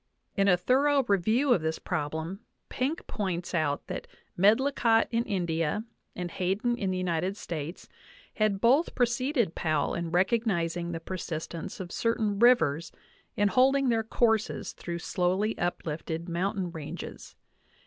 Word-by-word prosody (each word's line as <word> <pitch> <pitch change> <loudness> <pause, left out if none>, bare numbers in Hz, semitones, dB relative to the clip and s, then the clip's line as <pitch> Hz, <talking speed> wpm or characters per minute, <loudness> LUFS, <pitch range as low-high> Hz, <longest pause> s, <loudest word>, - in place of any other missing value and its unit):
In 200 -1 +3
a 180 -2 +5
thorough 275 +7 +3
review 225 +6 +3
of 180 - +1
this 160 0 -1
prob 150 0 -3
lem, 165 +5 -4 0.3
Penck* 275 +6 -2
points 185 -4 -3
out 150 -4 0
that - - -6 0.3
Medlicott 225 +3 +4
in 230 0 +1
India 170 -1 -1 0.3
and 175 -1 -4
Hayden 195 +7 0
in 200 -5 -2
the 185 - -1
United 185 +2 -1
States 165 -2 -6 0.5
had 215 -3 +1
both 265 - +3
preceded 245 - +1
Powell 155 -3 0
in 170 -1 -2
recognizing 175 -3 +1
the 165 - -3
persistence 165 -2 -5
of 180 -2 -6
certain 220 -3 0
rivers 175 - +4 0.5
in 205 0 +3
holding 265 +3 +4
their 225 -1 +2
courses 225 0 0
through 170 -1 -5
slowly 185 +5 0
uplifted 165 -1 -3
mountain 180 +1 -1
ranges. 160 -3 -8
190 Hz, 140 wpm, -28 LUFS, 170-230 Hz, 0.5 s, a